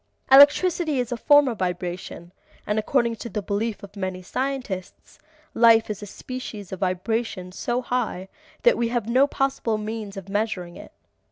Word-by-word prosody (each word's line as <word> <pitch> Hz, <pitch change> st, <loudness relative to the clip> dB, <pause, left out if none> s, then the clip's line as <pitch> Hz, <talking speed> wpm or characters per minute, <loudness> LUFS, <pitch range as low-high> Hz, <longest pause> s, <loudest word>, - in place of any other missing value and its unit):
Electricity 295 Hz, +2 st, +6 dB
is 245 Hz, -1 st, -2 dB
a -, -, 0 dB
form 290 Hz, +4 st, +5 dB
of 235 Hz, -4 st, -3 dB
vibration, 180 Hz, -1 st, -4 dB, 0.3 s
and 210 Hz, +1 st, 0 dB
according 235 Hz, +1 st, +1 dB
to 235 Hz, -, -7 dB
the 210 Hz, -1 st, -4 dB
belief 205 Hz, +3 st, -2 dB
of 200 Hz, +1 st, -11 dB
many 185 Hz, -2 st, -4 dB
scientists, 250 Hz, -5 st, -5 dB, 0.3 s
life 225 Hz, -1 st, +5 dB
is 210 Hz, -, -6 dB
a 205 Hz, -, -7 dB
species 215 Hz, -4 st, -8 dB
of 190 Hz, -, -6 dB
vibration 185 Hz, +1 st, -2 dB
so 240 Hz, +6 st, -2 dB
high 230 Hz, -8 st, -2 dB, 0.4 s
that -, -, +5 dB
we 235 Hz, -, +1 dB
have 235 Hz, -2 st, -2 dB
no 260 Hz, +4 st, +4 dB
possible 270 Hz, -6 st, -1 dB
means 215 Hz, -1 st, -6 dB
of 195 Hz, -1 st, -8 dB
measuring 195 Hz, -4 st, -2 dB
it. -, -, -12 dB
220 Hz, 165 wpm, -24 LUFS, 190-250 Hz, 0.4 s, Electricity